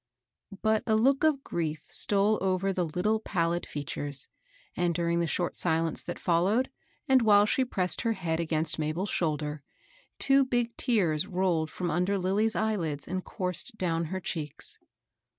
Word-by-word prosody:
But 220 Hz, 0 st, +3 dB
a 220 Hz, -, +3 dB
look 270 Hz, +6 st, +3 dB
of 300 Hz, -3 st, +3 dB
grief 160 Hz, -3 st, -3 dB
stole 205 Hz, +1 st, +2 dB
over 190 Hz, +1 st, +1 dB
the 180 Hz, -2 st, 0 dB
little 205 Hz, +7 st, 0 dB
pallid 175 Hz, -5 st, -1 dB
features, 145 Hz, -1 st, -3 dB, 0.5 s
and, 175 Hz, -1 st, +1 dB
during 170 Hz, 0 st, +1 dB
the 170 Hz, -, +1 dB
short 175 Hz, +2 st, -1 dB
silence 165 Hz, -1 st, 0 dB
that 175 Hz, -, -5 dB
followed, 195 Hz, +10 st, +1 dB, 0.4 s
and 265 Hz, -1 st, +5 dB
while 205 Hz, -2 st, +6 dB
she 260 Hz, +5 st, +2 dB
pressed 185 Hz, -8 st, 0 dB
her 230 Hz, -1 st, +1 dB
head 165 Hz, -5 st, -2 dB
against 160 Hz, -1 st, 0 dB
Mabel's 155 Hz, +6 st, -2 dB
shoulder, 150 Hz, -3 st, -1 dB, 0.6 s
two 275 Hz, 0 st, +4 dB
big 240 Hz, -2 st, -1 dB
tears 185 Hz, -, +1 dB
rolled 180 Hz, -5 st, 0 dB
from 175 Hz, 0 st, -3 dB
under 180 Hz, +5 st, +1 dB
Lilly's 200 Hz, +4 st, +1 dB
eyelids 175 Hz, -10 st, -1 dB
and 185 Hz, +1 st, -3 dB
coursed 180 Hz, +3 st, -2 dB
down 165 Hz, -3 st, 0 dB
her 185 Hz, +4 st, -3 dB
cheeks. 155 Hz, -5 st, -4 dB
180 Hz, 155 wpm, -29 LUFS, 165-215 Hz, 0.6 s, while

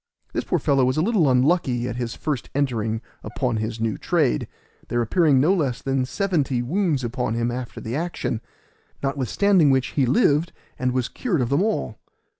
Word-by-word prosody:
This -, -, -1 dB
poor -, -, +1 dB
fellow 135 Hz, -2 st, +2 dB
was 130 Hz, +2 st, +1 dB
a -, -, +3 dB
little 195 Hz, -, +3 dB
unlucky 125 Hz, -2 st, +2 dB
at 120 Hz, -, -4 dB
his 120 Hz, -2 st, -3 dB
first 145 Hz, -6 st, -3 dB
entering 115 Hz, -6 st, 0 dB, 0.2 s
upon 115 Hz, +2 st, -2 dB
his 110 Hz, +1 st, -3 dB
new 115 Hz, -2 st, -1 dB
trade, -, -, +1 dB, 0.4 s
there 120 Hz, -, -1 dB
appearing 140 Hz, +4 st, +3 dB
no 155 Hz, +8 st, +4 dB
less 140 Hz, -9 st, 0 dB
than 135 Hz, -1 st, 0 dB
seventy 140 Hz, -6 st, 0 dB
wounds 160 Hz, -1 st, 0 dB
upon 120 Hz, -1 st, -2 dB
him 120 Hz, +1 st, 0 dB
after 125 Hz, 0 st, -5 dB
the 115 Hz, +3 st, -4 dB
action; 160 Hz, -8 st, -2 dB, 0.6 s
notwithstanding 145 Hz, -, +2 dB
which 130 Hz, -1 st, +2 dB
he 135 Hz, -4 st, +1 dB
lived 145 Hz, +5 st, +2 dB, 0.3 s
and 130 Hz, -1 st, +1 dB
was 125 Hz, -1 st, 0 dB
cured 200 Hz, -, -2 dB
of 120 Hz, -, 0 dB
them 140 Hz, +5 st, +2 dB
all. 195 Hz, -, -1 dB
130 Hz, 180 wpm, -23 LUFS, 120-155 Hz, 0.6 s, no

